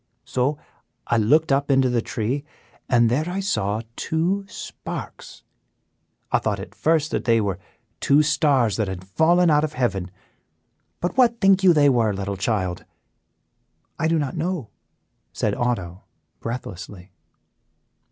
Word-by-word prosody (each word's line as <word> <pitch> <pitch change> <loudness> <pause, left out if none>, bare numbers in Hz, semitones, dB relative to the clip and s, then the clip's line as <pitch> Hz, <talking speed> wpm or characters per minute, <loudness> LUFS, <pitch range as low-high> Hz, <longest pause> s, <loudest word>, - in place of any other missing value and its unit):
So 135 +4 0 0.5
I 120 - +1
looked 145 +9 +3
up 140 +1 +1
into 135 -1 +4
the 120 -2 +1
tree, 120 +6 -2 0.5
and 120 -2 +4
there 145 +9 0
I 185 +2 -3
saw 110 - -1
two 180 +5 -1
sparks. - - -8 0.9
I - - +3
thought - - -2
at - - -9
first 160 -1 +1
that - - -2
they 115 -1 +4
were 100 -3 -2 0.4
two 145 +2 +4
stars 140 - +2
that 110 -3 0
had 95 -1 -6
fallen 165 - +3
out 150 0 +4
of 155 -1 -2
heaven; 100 -9 -1 0.9
but 175 - -2
what 235 -2 +4
think 195 -1 +4
you 185 - +7
they 150 -3 +4
were, 115 -6 +3
little 100 0 -3
child?" 95 -3 -2 1.2
"I 160 - +1
do 165 0 +2
not 145 -4 -2
know," 170 - -3 0.6
said - - -1
Otto, 95 -7 -2 0.4
breathlessly. 100 -5 -7
130 Hz, 140 wpm, -23 LUFS, 105-160 Hz, 1.2 s, you